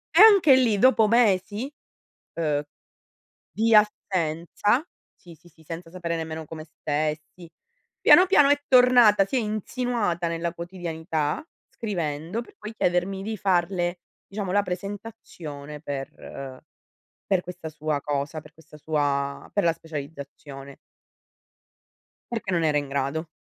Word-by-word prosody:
anche 390 -8 +8
lì 235 -5 +3
dopo 225 -1 +5
mesi, 220 +2 +2 0.6
uhm, 150 -3 0 0.9
di 225 +1 +2
assenza 200 - +1 0.3
sì, 170 -2 -15
sì, 175 +2 -21
sì, 160 0 -22
senza 165 +2 -8
sapere 170 -2 -3
nemmeno 160 0 -5
come 155 0 -9
stessi. 155 +2 -4 0.5
Piano, 365 +1 +7
piano 295 -6 +5
è 290 0 +3
tornata, 245 -6 +6
si 195 - -3
è - - +4
insinuata 215 -4 -2
nella 165 0 -2
quotidianità 165 - -3 0.3
scrivendo 170 -1 -3
per - - -18
poi 210 +1 -8
chiedermi 180 +1 0
di 220 +2 -4
farle, 175 -1 0 0.3
diciamo, 200 -2 -5
la 205 0 +3
presentazione 180 -7 -7
per 135 -2 -7 0.7
per 190 -3 +2
questa 180 -3 -8
sua 155 -1 -2
cosa, 145 +2 -3
per 150 +1 -17
questa 155 -1 -17
sua 145 -2 -2
per 205 - +2
la 165 - +4
specializzazione. 140 -3 -9 1.5
Perché 225 -5 -3
non 170 -2 +1
era 150 -2 +2
in 145 -1 -2
grado. 140 +4 -2
175 Hz, 125 wpm, -25 LUFS, 155-210 Hz, 1.5 s, anche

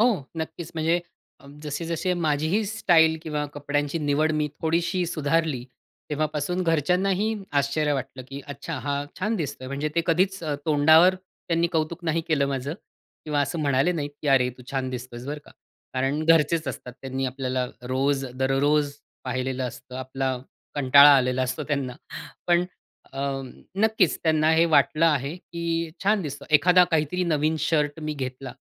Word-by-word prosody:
हो, 235 - +6 0.3
नक्कीच. 160 +1 -5
म्हणजे 165 +2 +1 0.4
अ, - - -16 0.2
जसे-जसे 165 +4 -2
माझीही 160 +5 +1
स्टाईल 170 -7 +4
किंवा 150 -2 -2
कपड्यांची 145 +2 -2
निवड 150 +1 +1
मी 150 - 0
थोडीशी 170 +3 +1
सुधारली, 155 -4 0 0.5
तेव्हापासून 155 +4 -1
घरच्यांनाही 180 +6 +1 0.3
आश्चर्य 145 +2 0
वाटलं, 130 -1 -4
की 140 +1 -7
"अच्छा, 145 +3 -6
हा 140 +1 -2
छान 215 +4 0
दिसतोय." 140 -5 -4
म्हणजे 140 +3 -2
ते 170 - +3
कधीच 185 +3 +1
अ, 150 - -1
तोंडावर 160 +4 +6
त्यांनी 175 -2 -2
कौतुक 165 +2 -1
नाही 165 0 +1
केलं 145 -4 +2
माझं 140 +3 -3 0.5
किंवा 150 -2 0
असं 145 +4 -1
म्हणाले 140 +4 +2
नाहीत, 145 -4 -3
की 145 - -1
"अरे, 130 -2 +4
तू - - -11
छान 130 -1 -2
दिसतोयस 125 -1 -7
बरं 145 +1 -4
का." - - -16 0.4
कारण 135 +4 0
घरचेच 165 -2 +3
असतात, 125 0 -6
त्यांनी 135 0 -3
आपल्याला 130 -1 -2 0.2
रोज 135 +2 0
दररोज 140 +3 +2 0.3
पाहिलेलं 130 0 -2
असतं. 125 +1 -10
आपला 130 0 -2 0.4
कंटाळा 140 +1 +8
आलेला 130 0 +1
असतो 130 0 -2
त्यांना. 135 -4 -1 0.5
पण 175 0 +3 0.5
अ, 135 - -5 0.6
नक्कीच 215 -4 +2
त्यांना 155 -1 +3
हे 165 +1 +5
वाटलं 160 +2 +3
आहे, 145 0 +1
की 170 -2 -3
छान 205 -1 +3
दिसतं. 145 -2 -6
एखादा 180 +4 +6
काहीतरी 165 +3 +1
नवीन 155 -1 +1
शर्ट 150 -1 0
मी 155 0 -3
घेतला. 130 -1 -5
150 Hz, 155 wpm, -25 LUFS, 135-165 Hz, 0.6 s, कंटाळा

